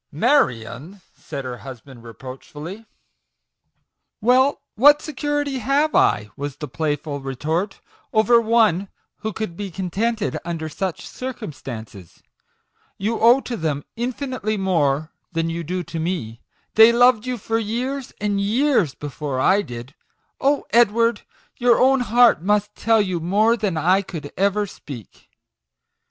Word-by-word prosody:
" - - -58
Marion! 150 - 0
" - - -39
said 140 -3 -7
her 125 -1 -5
husband 130 -1 -11
reproachfully. 135 - -9
t( 225 - -20 1.3
Well, 255 +4 +3
what 290 +6 +6
security 290 -2 -2
have 280 +5 +1
I," 105 0 +2
was 145 -1 -5
the 150 - -6
play 150 +2 -1
ful 145 0 -6
retort, 155 +9 -3 0.2
" - - -36
over 225 +2 +4
one 220 -5 +3 0.3
who 220 - -4
could 215 -6 -5
be 200 +1 -5
contented 200 +5 -2
under 165 -2 -4
such 180 +1 -4
circumstances? 130 - -8 0.7
You 215 +4 -1
owe 240 +4 +6
to 245 - -5
them 150 -6 -2
infinitely 245 -3 -3
more 155 -6 +1 0.2
than 165 0 -1
you 170 +1 -4
do 180 +3 -3
to 165 0 -6
me 160 -10 -3 0.3
they 220 +1 +8
loved 245 -1 +4
you 250 -1 -2
for 225 +1 -1
years 245 +5 -3
and 205 -1 0
years 220 - +2
before 145 -2 -4
I 195 +9 +4
did. 120 -5 -8 0.5
Oh, 280 +1 +1
Edward! 230 0 +3 0.4
your 240 -1 +4
own 265 +1 +4
heart 240 -6 +4
must 210 +2 +1
tell 225 0 +2
you 185 -3 -2
more 205 +7 +3
than 205 -7 -2
I 180 +5 +3
could 160 -7 -8
ever 200 +2 +1
speak." 135 - -11
200 Hz, 145 wpm, -22 LUFS, 150-235 Hz, 1.3 s, they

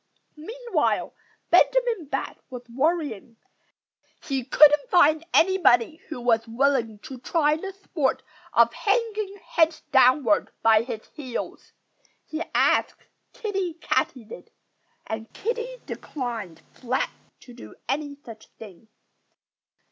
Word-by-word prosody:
Meanwhile 440 +2 -2 0.4
Benjamin 480 -8 +3
Bat - - -4
was 250 -1 -8
worrying. 265 - -2 0.9
He 270 -3 -2
couldn't 295 +3 +5
find 315 -2 +4
anybody 325 -7 +4
who 310 - -5
was 230 -1 +1
willing 235 -2 +1
to 260 -2 -9
try 300 +3 +1
the 385 +5 -6
sport 360 -8 -2 0.3
of - - +4
hanging 425 -2 -1
head 325 -1 +2
downward 255 -3 +4
by 220 -1 +5
his 230 -2 -6
heels. 260 -5 -7 0.5
He 315 +1 -5
asked - - +2 0.3
Kiddie 390 -6 -3
Katydid; 245 -9 -3 0.6
and 220 0 -6
Kiddie 475 +3 -3
declined 230 - -6
flatly 255 +1 -2 0.3
to 245 - -14
do 105 - -12
any 285 +2 -2
such 220 -2 -11
thing. 215 -1 -13
285 Hz, 110 wpm, -25 LUFS, 235-350 Hz, 0.9 s, couldn't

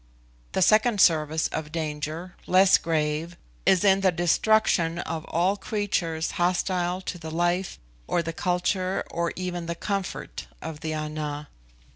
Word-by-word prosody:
The 190 - +3
second 215 +2 +4
service 160 -3 +3
of 155 -1 -5
danger, 155 +2 -4
less 185 +1 +6
grave, 160 +1 -1 0.3
is 190 -1 +5
in 195 -1 +4
the 190 -1 +4
destruction 175 0 +2
of 165 -2 -4
all 180 +4 +1
creatures 185 -6 -1
hostile 180 0 0
to 180 -1 -5
the 160 -1 -7
life, 175 +3 0 0.3
or 170 - +1
the 165 0 -4
culture, 185 +1 0
or 170 0 -1
even 175 -2 -4
the 170 - -2
comfort, 195 +1 -4
of 150 - -7
the 155 0 -3
Ana. 150 -1 -4
175 Hz, 140 wpm, -26 LUFS, 160-185 Hz, 0.3 s, less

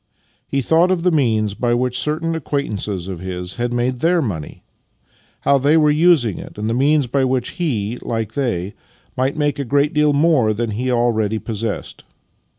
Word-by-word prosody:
He 135 -1 -1
thought 165 +7 +3
of 185 -2 0
the 180 - +3
means 110 -9 +1
by 120 +3 0
which 125 0 0
certain 160 +2 -1
acquaint 145 -5 -2
ances 95 -3 -3
of 95 -3 -5
his 90 +1 -6
had 120 0 -1
made 120 +1 -1
their 170 +4 +2
money, 95 - -4 0.8
how 140 0 +3
they 145 +4 +3
were 150 -1 +4
using 150 - +3
it, - - -10
and 105 +1 -3
the 115 - 0
means 145 +3 +3
by 135 +3 0
which 130 -2 0
he, 120 -7 -1
like 115 -2 -3
they, 105 -9 -2 0.4
might 135 +3 -1
make 145 -1 0
a - - 0
great 145 +4 +1
deal 150 -1 +3
more 140 -7 +3
than 115 0 -2
he 125 +5 -2
already 110 -3 +1
possessed. 110 -1 -5
125 Hz, 185 wpm, -19 LUFS, 110-150 Hz, 0.8 s, were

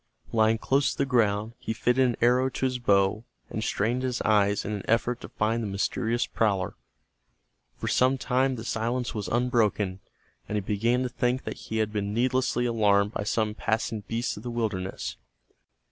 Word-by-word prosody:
Lying 110 0 +3
close 140 +4 +1
to - - -13
the 140 - +2
ground, 110 -4 +1
he 110 - -3
fitted 125 +3 +2
an 120 - -1
arrow 125 +2 +4
to 130 - -2
his 130 -1 -1
bow, 100 -1 +2 0.3
and 110 - -3
strained 115 +4 0
his 130 -2 -1
eyes 105 -1 +2
in 105 - -3
an 105 -2 -3
effort 115 +2 +1
to - - -8
find 110 +2 0
the 110 - -2
mysterious 110 +4 0
prowler. 100 -4 0 1.0
For - - -4
some 130 +1 +3
time 130 +1 +1
the 115 -1 -7
silence 120 +3 -1
was 105 -2 -4
unbroken, 110 -6 +1 0.5
and 105 - -2
he 105 - +1
began 115 +6 +1
to 125 - -2
think 125 +1 0
that - - -5
he 110 - -1
had 110 -1 0
been 105 0 -2
needlessly 125 0 +1
alarmed 105 -3 +3
by 100 - -3
some 110 0 0
passing 110 0 -1
beast 115 +2 -2
of - - -7
the 125 - -5
wilderness. 105 -6 -3
115 Hz, 185 wpm, -27 LUFS, 105-125 Hz, 1.0 s, arrow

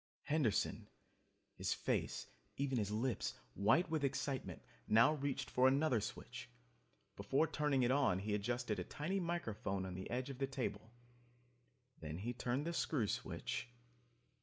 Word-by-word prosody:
Henderson, 145 -8 +1 0.7
his - - -1
face - - -1 0.3
even 135 -3 +1
his 105 -2 0
lips 115 +4 -1 0.2
white 115 - +4
with 155 -3 +1
excitement, 140 0 -2 0.2
now 115 +7 +6
reached 140 -2 -2
for 130 +1 +4
another 135 -3 +3
switch. - - -6 0.7
Before 135 +10 +2
turning 150 -4 +1
it 120 - +3
on 135 -9 +4
he 105 +2 -2
adjusted 115 +2 -1
a - - -1
tiny 175 +7 -2
microphone 110 - -2
on 95 - -5
the 95 +1 -5
edge 125 +3 -2
of 130 - -9
the 135 - +1
table. 130 -4 -3 1.1
Then 80 0 -5
he 115 +6 -3
turned 125 +4 -1
the 170 - -1
screw 145 -8 +1
switch 100 - -3
130 Hz, 145 wpm, -38 LUFS, 105-145 Hz, 1.1 s, now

